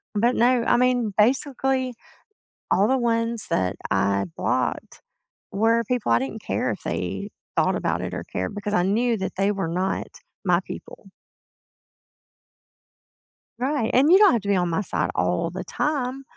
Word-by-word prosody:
But, 235 +4 +2
no, 245 0 +3
I 240 - +3
mean, 245 -3 +2
basically, 260 +2 +1 0.8
all 200 +2 +4
the 265 +1 +2
ones 230 -2 -1
that 90 -1 0 0.2
I 100 0 +1
blocked - - -2 0.5
were 225 +3 +2
people 245 - -1
I 115 - +5
didn't 135 0 -5
care - - -1
if - - -6
they - - -3 0.3
thought - - +3
about - - -1
it - - -4
or - - -4
cared 95 - -3
because 205 0 -4
I 180 - +3
knew 230 +4 +1
that 190 - -4
they 195 +2 +1
were 195 -4 -2
not 185 +3 -2 0.4
my 175 -1 +4
people. 195 - -10 2.5
Right, 265 -2 0
and 275 +6 +4
you 375 - +8
don't 410 -2 +7
have 235 - 0
to 200 - -6
be 200 - +3
on 175 -1 +1
my 190 +5 0
side - - -1
all - - 0
the - - -6
time, 270 -3 -2
230 Hz, 165 wpm, -24 LUFS, 190-250 Hz, 2.5 s, you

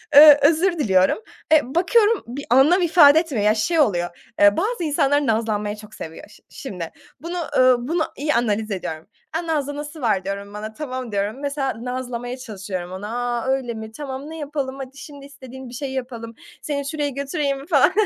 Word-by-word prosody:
eee, 295 0 +10
özür 335 +5 +3
diliyorum. 190 -8 +3 0.4
E, 295 -3 +3
bakıyorum 425 +4 +3
bir 270 +4 -6
anlam 280 +10 +5
ifade 320 -3 +7
etmiyor, 275 -11 -2
ya, 215 +1 +4
şey 320 +10 +1
oluyor, 175 - -1
eee, 205 0 +6
bazı 420 +1 -1
insanlar 290 -1 +2
nazlanmayı 215 -2 0
çok 215 0 -13
seviyor 160 +4 -9
şi 210 - -18
şimdi. 180 -11 -7 0.3
Bunu, 340 +3 -5 0.2
ııı, 255 -1 +4
bunu 330 +1 +1
iyi 300 +2 0
analiz 220 -2 0
ediyorum. 160 -4 -5 0.3
"A, 335 +1 -3
nazlanası 295 0 -3
var," 210 -6 +1
diyorum 200 +1 -5
bana, 215 +1 -6
tamam 255 -2 -5
diyorum. 205 +5 -2
Mesela, 280 -2 -1
nazlamaya 250 -1 -4
çalışıyorum 195 -7 -6
onu, 190 +2 -6
"A, 240 +1 -2
öyle 265 -3 0
mi? 220 -1 -8
Tamam, 275 +3 -7
ne 320 - -7
yapalım," 285 -3 -4
hadi 270 0 -8
şimdi 280 0 -11
istediğin 265 -2 -11
bir - - -12
şeyi 265 +2 -5
yapalım, 235 -3 -6 0.3
seni 280 -2 -3
şuraya 295 -1 -1
götüreyim 280 0 -2
mi, 280 - -13
falan, 295 -1 +4
265 Hz, 180 wpm, -22 LUFS, 220-295 Hz, 0.4 s, eee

